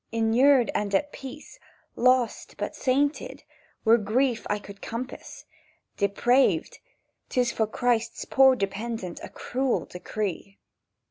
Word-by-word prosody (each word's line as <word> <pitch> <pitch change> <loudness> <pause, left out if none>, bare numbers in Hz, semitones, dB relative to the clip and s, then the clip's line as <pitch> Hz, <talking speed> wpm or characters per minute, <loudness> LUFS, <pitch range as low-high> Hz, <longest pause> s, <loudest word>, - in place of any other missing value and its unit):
"Inurned 235 +3 +4
and 200 -1 -1
at 290 +8 0
peace, 295 - -10 0.4
lost 255 -1 +1
but - - -4
sainted, 280 +3 0 0.4
Were 230 +2 +6
grief 230 +3 0
I 210 - +1
could 200 -1 -12
compass; 245 +3 -7 0.5
Depraved—'tis 245 - 0
for 220 -2 0
Christ's 235 0 -1
poor 265 -1 +5
dependent 200 -2 -4
A - - -8
cruel 260 0 -2
decree!" 195 +1 -5
235 Hz, 110 wpm, -26 LUFS, 210-260 Hz, 0.5 s, Were